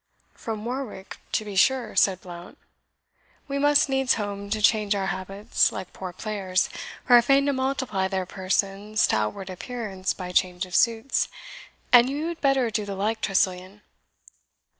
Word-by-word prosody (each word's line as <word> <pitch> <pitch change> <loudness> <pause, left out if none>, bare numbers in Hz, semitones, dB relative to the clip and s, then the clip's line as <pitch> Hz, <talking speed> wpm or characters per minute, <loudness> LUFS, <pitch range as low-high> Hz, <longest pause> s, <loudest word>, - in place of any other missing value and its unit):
"From 220 -1 -6
Warwick, 245 -6 -5 0.2
to 215 - 0
be 205 -2 -7
sure," 250 +4 +2
said 190 -2 +3
Blount; 175 -1 -11 0.9
"we 280 0 -2
must 290 0 +4
needs 270 -1 +2
home 200 -2 -5
to 215 +1 -1
change 210 -1 +3
our 195 -1 -1
habits, 195 +2 0
like 190 -2 -7
poor 185 -1 -6
players, 190 -1 -1 0.3
who 250 - +3
are 240 - +9
fain 275 +3 +3
to 285 - +1
multiply 260 -7 -1
their 190 -1 -2
persons 195 +3 0
to - - +2
outward 145 - -2
appearance 195 -2 -4
by 180 -1 -6
change 180 +1 +1
of 180 - -14
suits; 230 +5 +2 0.6
and 245 +1 +8
you 295 +4 -2
had 340 - -7
better 270 -4 +2
do 210 0 -1
the 200 -1 -5
like, 215 +3 -1
Tressilian." 185 +1 -1
210 Hz, 160 wpm, -25 LUFS, 190-245 Hz, 0.9 s, are